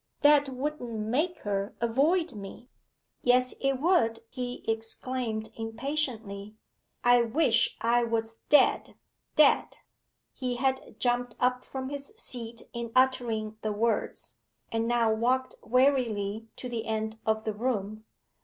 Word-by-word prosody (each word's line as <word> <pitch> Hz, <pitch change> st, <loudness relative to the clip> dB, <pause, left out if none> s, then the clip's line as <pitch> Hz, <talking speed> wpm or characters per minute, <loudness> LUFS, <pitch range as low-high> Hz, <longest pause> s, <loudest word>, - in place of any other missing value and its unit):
'That 290 Hz, -1 st, +6 dB
wouldn't 265 Hz, -1 st, -4 dB
make 290 Hz, +12 st, 0 dB
her 200 Hz, -1 st, -2 dB
avoid 300 Hz, +10 st, +2 dB
me.' 205 Hz, +3 st, -9 dB, 0.5 s
'Yes 250 Hz, +1 st, +3 dB
it 275 Hz, 0 st, +2 dB
would,' 275 Hz, -9 st, +2 dB
he 250 Hz, -1 st, -5 dB
exclaimed 225 Hz, 0 st, -3 dB
impatiently. 225 Hz, -4 st, -3 dB, 0.5 s
'I 245 Hz, 0 st, +6 dB
wish 235 Hz, -2 st, +2 dB
I 240 Hz, +1 st, +3 dB
was 225 Hz, -1 st, -1 dB, 0.2 s
dead 295 Hz, -, +4 dB, 0.4 s
dead!' 300 Hz, -2 st, +4 dB, 0.6 s
He 250 Hz, -2 st, -3 dB
had 265 Hz, +1 st, -1 dB
jumped 245 Hz, -1 st, 0 dB
up 250 Hz, 0 st, +1 dB
from 260 Hz, -1 st, -5 dB
his 285 Hz, +6 st, -7 dB
seat 235 Hz, -, -5 dB
in 235 Hz, -1 st, -4 dB
uttering 235 Hz, -5 st, +2 dB
the 215 Hz, -, -1 dB
words, 220 Hz, +1 st, -2 dB, 0.3 s
and 225 Hz, 0 st, 0 dB
now 235 Hz, -2 st, +3 dB
walked 255 Hz, +4 st, +1 dB
wearily 225 Hz, -4 st, +1 dB
to 250 Hz, -, -6 dB
the 230 Hz, -2 st, -4 dB
end 220 Hz, 0 st, -2 dB
of 220 Hz, 0 st, +1 dB
the 220 Hz, -, -2 dB
room. 215 Hz, -2 st, -2 dB
240 Hz, 125 wpm, -29 LUFS, 220-260 Hz, 0.6 s, That